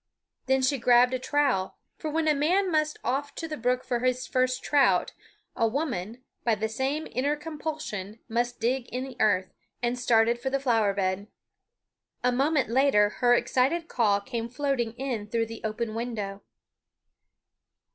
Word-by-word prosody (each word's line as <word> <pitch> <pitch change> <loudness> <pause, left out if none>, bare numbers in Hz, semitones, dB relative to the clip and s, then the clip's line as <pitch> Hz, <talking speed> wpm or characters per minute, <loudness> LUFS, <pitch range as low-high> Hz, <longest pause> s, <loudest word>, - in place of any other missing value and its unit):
Then 265 0 +2
she 265 +1 +2
grabbed 245 +1 +5
a 255 - 0
trowel 270 -9 0 0.2
for 315 - -3
when 315 +1 0
a 305 - +5
man 355 +7 +2
must 305 -1 +1
off 275 +4 -2
to 325 - -4
the 310 - -4
brook 250 0 0
for 240 - -1
his 255 +1 0
first 255 0 0
trout 285 -2 +3 0.4
a 230 - +2
woman, 240 - -3 0.2
by 230 -2 +2
the 215 +1 -1
same 265 +7 -2
inner 280 +4 0
compulsion, 300 - -5
must 240 +1 -1
dig 245 +2 0
in 250 +1 -3
the 265 -2 -8
earth 190 -3 +2 0.3
and 245 0 -1
started 235 -1 +3
for 265 - -2
the 275 +1 0
flower 225 -7 +2
bed. 190 +1 -1 1.0
A 250 - +3
moment 275 +2 +2
later 235 -5 +4
her 245 -1 +6
excited 265 +7 +1
call 210 -8 +2
came 230 +2 -4
floating 250 -3 -1
in 240 -4 -4
through 230 +1 0
the 225 0 -9
open 220 +1 -3
window. 215 -4 -4
250 Hz, 165 wpm, -27 LUFS, 225-275 Hz, 1.0 s, her